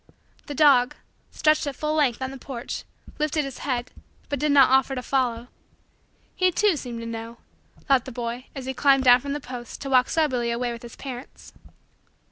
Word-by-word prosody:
The 290 - -5
dog, 260 -4 +5 0.3
stretched 305 -1 +2
at 280 - -3
full 305 +3 -2
length 270 -5 +1
on 260 - -3
the 270 - -8
porch, 250 -2 -6 0.3
lifted 305 0 0
his 270 -2 -7
head 250 -3 -2 0.4
but 285 - -2
did 300 +1 +1
not 275 -2 +6
offer 265 0 +3
to 250 - -4
follow. 245 -3 -1 0.9
He, 370 -1 +3
too, 410 +1 +2
seemed 240 -5 -6
to - - -6
know, 230 0 -6 0.5
thought 270 -3 +3
the 260 - -7
boy 240 +1 -5
as 270 -2 -6
he 265 - -3
climbed 270 0 +4
down 245 -1 +7
from 280 +1 -4
the 295 - -3
post 245 -3 -8
to 275 - -5
walk 255 -1 +4
soberly 260 -7 +1
away 240 +1 -1
with 235 -1 -7
his 240 -1 -10
parents. 260 -1 -9
260 Hz, 195 wpm, -25 LUFS, 245-285 Hz, 0.9 s, down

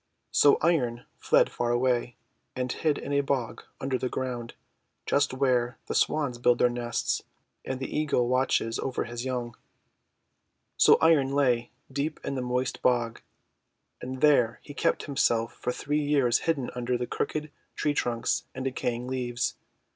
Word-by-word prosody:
So 145 - +5
Iron 125 -8 +1
fled - - +3
far 120 - -1
away, 120 0 +1 0.4
and 125 -1 -2
hid 155 +2 0
in 145 - -4
a 140 - +3
bog 135 -4 -2 0.2
under 130 -1 -1
the 130 - -1
ground, 120 -3 -4 0.5
just 140 - +2
where 125 -2 +1
the - - -4
Swans 140 -6 +1
build 120 0 +4
their 125 - +3
nests 120 -1 -1 0.4
and 130 -1 -4
the 130 - -5
Eagle 145 -5 +1
watches 125 -2 +1
over 130 - -2
his 120 +1 -6
young. 120 -2 -3 1.2
So - - +6
Iron 155 -5 +4
lay 125 -4 +2 0.2
deep 145 +3 -2
in - - -2
the 130 - -2
moist 125 +1 -2
bog, 120 -2 +1 0.8
and 130 0 -6
there 125 -6 +4
he 145 - -10
kept - - 0
himself 115 -5 +1
for 125 - -3
three 145 +4 -1
years 140 -5 +3
hidden 140 -6 0
under 125 0 -1
crooked 150 +4 -3 0.2
tree 150 - 0
trunks 120 -4 -1
and 130 0 -4
decaying 125 -2 -2
leaves. 125 -2 -2
125 Hz, 155 wpm, -27 LUFS, 120-140 Hz, 1.2 s, So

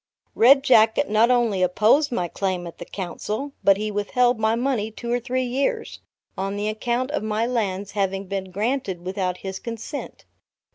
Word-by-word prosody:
Red 270 +4 +6
Jacket 225 0 +4
not 220 +3 +4
only 235 -6 +2
opposed 220 - +3
my 180 -7 -1
claim 185 0 -2
at 170 - -10
the - - -7
Council, 210 +8 -5
but 195 -1 +5
he 215 +1 -3
withheld 240 +4 +1
my 220 +1 +2
money 235 -3 -1
two 235 +2 -6
or 245 - +2
three 255 +1 -1
years, 255 +3 -2 0.4
on 195 +1 -3
the 205 +1 -2
account 240 +4 -2
of 300 - -1
my 215 +1 -1
lands 205 -5 -2
having 195 -1 -1
been 190 0 -4
granted 200 -2 -2
without 185 -1 -2
his 190 0 -4
consent. 235 +4 -7
215 Hz, 175 wpm, -23 LUFS, 195-245 Hz, 0.4 s, Red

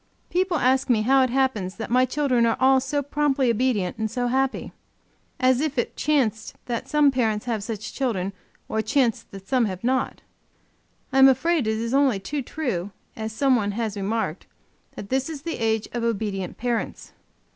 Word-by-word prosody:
People 365 -1 +1
ask 260 0 +2
me 220 -3 +3
how 265 +3 +4
it 260 - +2
happens 235 -8 0
that 225 - -6
my 255 +1 +4
children 255 -3 +1
are 230 - +1
all 265 0 +5
so 285 +2 -2
promptly 280 -3 +1
obedient 225 -5 0
and 220 0 -1
so 245 +2 -2
happy. 265 +2 0 0.7
As 255 0 +3
if 300 -3 -2
it 240 - -1
chanced 240 -8 0
that 235 -2 -4
some 300 -2 +4
parents 225 -5 0
have 225 -4 -2
such 215 0 -5
children, 200 -8 -1 0.3
or 220 - -1
chanced 235 +1 0
that 195 -1 -11
some 255 -3 +2
have 185 -1 -5
not! 255 +1 0 0.9
I 270 - +3
am 270 - +9
afraid 300 0 +2
it 220 0 0
is 230 +2 -3
only 270 -7 +3
too 280 +9 -3
true, 240 - -3 0.3
as 220 0 -4
some 265 +4 +2
one 205 -3 0
has 220 -1 -2
remarked, 200 -3 -2 0.5
that 200 - -8
"this 265 +3 0
is 295 -3 -7
the 330 -4 -4
age 220 -1 0
of 240 -1 -2
obedient 205 -5 -2
parents!" 240 -1 -3
245 Hz, 185 wpm, -24 LUFS, 220-270 Hz, 0.9 s, am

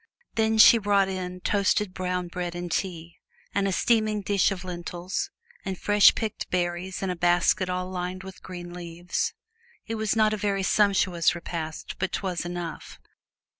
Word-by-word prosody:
Then 220 0 +2
she 230 +1 +9
brought 200 -2 +2
in 180 -1 -5
toasted 200 0 +1
brown 180 -1 -2
bread 175 0 -4
and 175 0 -5
tea, 170 -1 -3 0.3
and 200 0 +1
a - - 0
steaming 215 0 +2
dish 200 0 +3
of 190 -2 -4
lentils, 180 - -4 0.3
and 190 -2 -4
fresh 205 +1 +6
picked 220 -2 -3
berries 180 +1 -2
in 190 - 0
a - - -3
basket 175 +2 +2
all 180 0 -2
lined 185 0 -4
with 190 0 -10
green 175 -1 -8
leaves. 175 0 -3 0.5
It 225 - -4
was 215 0 +1
not 215 -1 +3
a - - -1
very 200 -1 0
sumptuous 185 -4 +3
repast, 165 -2 -5
but 190 0 -1
't - - -2
was 180 -3 -2
enough. 175 -2 -6
185 Hz, 170 wpm, -26 LUFS, 175-200 Hz, 0.5 s, she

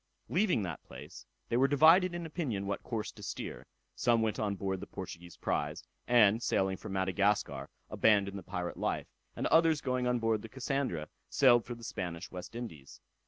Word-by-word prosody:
Leaving 180 - +2
that 85 -5 -5
place, - - -11 0.2
they 120 - +1
were 135 +2 +5
divided 165 +6 +6
in 175 -1 -4
opinion 145 - -3
what 100 0 -2
course 110 -4 -4
to - - -14
steer; - - -6 0.3
some 115 -2 +2
went 110 -1 -1
on 105 -2 0
board 95 -1 -2
the 100 - -8
Portuguese 85 -2 -8
prize, - - -2 0.2
and, 115 -2 +5
sailing 95 -4 +1
for 95 - -9
Madagascar, 95 +2 0 0.2
abandoned 100 -2 +2
the - - -9
pirate 90 -1 -4
life; - - -1 0.3
and - - -3
others 160 -2 +4
going 130 -3 -1
on 125 0 +2
board 115 -2 +1
the 115 - -9
Cassandra, 130 - -2 0.2
sailed 120 -4 +5
for 120 - -5
the 115 - -13
Spanish 85 -4 -5
West 90 +4 -8
Indies. 80 - -8
110 Hz, 180 wpm, -32 LUFS, 95-130 Hz, 0.3 s, divided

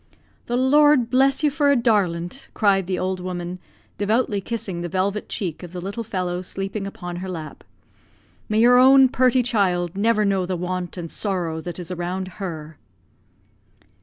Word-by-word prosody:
"The 240 - 0
Lord 270 -1 +4
bless 270 +3 +3
you 300 - +3
for 290 0 +2
a 280 - +5
darlint," 205 -3 0
cried 195 -4 +2
the 185 -1 -1
old 185 0 -2
woman, 180 0 -5 0.4
devoutly 210 0 +1
kissing 195 -5 -4
the 175 - -4
velvet 195 +3 -1
cheek 175 -6 -4
of 180 -1 -10
the 180 - -5
little 200 +6 -5
fellow 185 -5 -3
sleeping 195 +2 -4
upon 175 -3 -7
her 190 +1 -5
lap. 160 -4 -7 0.9
"May 215 +1 +2
your 245 +1 +6
own 265 0 +7
purty 255 0 +3
child 185 -7 0
never 215 +1 +2
know 195 -2 +1
the 185 -1 -2
want 180 0 -4
and 170 -2 -6
sorrow 175 -6 -2
that 175 0 -6
is 180 0 -7
around 180 +1 -3
her." 160 -4 -6
195 Hz, 165 wpm, -22 LUFS, 175-230 Hz, 0.9 s, own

